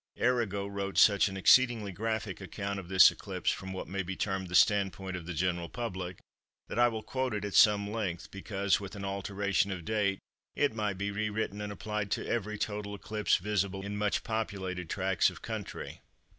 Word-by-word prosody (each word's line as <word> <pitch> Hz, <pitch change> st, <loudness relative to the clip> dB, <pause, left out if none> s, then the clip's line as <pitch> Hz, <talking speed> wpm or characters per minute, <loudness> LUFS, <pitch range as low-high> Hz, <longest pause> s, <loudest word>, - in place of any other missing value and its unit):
Arago 110 Hz, -6 st, +1 dB
wrote 100 Hz, -1 st, -4 dB
such 100 Hz, -1 st, +6 dB
an 95 Hz, -1 st, -5 dB
exceedingly 115 Hz, 0 st, +5 dB
graphic 110 Hz, 0 st, -3 dB
account 100 Hz, +1 st, -4 dB
of 90 Hz, -, -9 dB
this 95 Hz, 0 st, +8 dB
eclipse -, -, -2 dB
from 95 Hz, 0 st, -5 dB
what 95 Hz, -, -5 dB
may 95 Hz, +1 st, -2 dB
be 95 Hz, +1 st, -4 dB
termed 95 Hz, -2 st, -2 dB
the 90 Hz, -, -4 dB
standpoint 95 Hz, -1 st, +3 dB
of 85 Hz, -2 st, -7 dB
the 90 Hz, -, -3 dB
general 85 Hz, -1 st, -1 dB
public, 95 Hz, -7 st, -4 dB, 0.5 s
that -, -, -3 dB
I 120 Hz, -, +7 dB
will 110 Hz, -2 st, -3 dB
quote 130 Hz, -3 st, -2 dB
it 105 Hz, -1 st, -3 dB
at 100 Hz, -, -4 dB
some 105 Hz, -1 st, +6 dB
length, 95 Hz, -7 st, -3 dB
because, 100 Hz, 0 st, 0 dB
with 100 Hz, +1 st, -8 dB
an 100 Hz, -1 st, -5 dB
alteration 100 Hz, 0 st, 0 dB
of 90 Hz, -3 st, -5 dB
date, 105 Hz, -3 st, +1 dB, 0.4 s
it 145 Hz, -5 st, +2 dB
might 105 Hz, -3 st, -2 dB
be 100 Hz, +1 st, -2 dB
re 105 Hz, +1 st, -1 dB
written 105 Hz, -1 st, -3 dB
and 105 Hz, 0 st, -4 dB
applied 105 Hz, 0 st, -3 dB
to -, -, -3 dB
every 105 Hz, -2 st, -2 dB
total 105 Hz, -1 st, -3 dB
eclipse 105 Hz, +1 st, 0 dB
visible 100 Hz, 0 st, -1 dB
in 100 Hz, 0 st, -4 dB
much 105 Hz, 0 st, 0 dB
populated 95 Hz, -6 st, -3 dB
tracts 95 Hz, -2 st, +2 dB
of -, -, -12 dB
country. -, -, -6 dB
100 Hz, 195 wpm, -31 LUFS, 95-105 Hz, 0.5 s, this